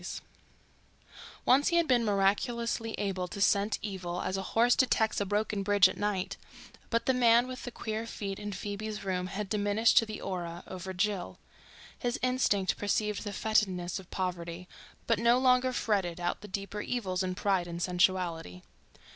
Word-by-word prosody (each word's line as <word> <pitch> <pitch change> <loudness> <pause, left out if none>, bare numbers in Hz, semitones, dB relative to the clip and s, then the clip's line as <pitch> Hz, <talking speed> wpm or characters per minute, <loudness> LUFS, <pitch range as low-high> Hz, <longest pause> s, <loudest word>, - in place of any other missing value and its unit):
STILL - - -6
WEEDING - - -33 0.4
Once 270 +3 +5
he 340 - +2
had 340 -1 +3
been 245 -3 +3
miraculously 225 +3 0
able 190 -3 -2
to 200 - -8
scent 200 +1 +2
evil 185 -4 -4
as 185 - -2
a 195 - -2 0.2
horse 240 +2 +5
detects 220 -5 +2
a 200 - -1
broken 205 0 0
bridge 200 -1 +5
at 185 - -5
night, 200 -2 -2 0.5
but 230 0 0
the 260 - +3
man 240 -1 +5
with 255 -1 -7
the 245 - -5
queer 220 0 -4
feet 200 -3 -5
in 205 0 -5
Phoebe's 205 +2 -5
room 185 -2 -2
had 200 +2 -4
diminished 205 +2 +3
to 225 - -2
the 215 - -6
aura 175 -2 -5
over 190 0 -6
Jill. 190 0 -2 0.6
His 240 -2 -1
instinct 250 -7 +1
perceived 210 0 -1
the 205 - -4
fetidness 190 -4 0
of 190 - -14
poverty, 180 -1 -4 0.4
but 230 -3 +2
no 235 +1 +4
longer 255 0 +3
ferreted 195 -8 -1
out 175 +1 -2
the 210 - -9
deeper 200 +1 -4
evils 195 -7 -2
in 185 -1 -2
pride 190 -2 +1
and 170 0 -5
sensuality. 175 - 0
205 Hz, 175 wpm, -30 LUFS, 185-225 Hz, 0.6 s, Once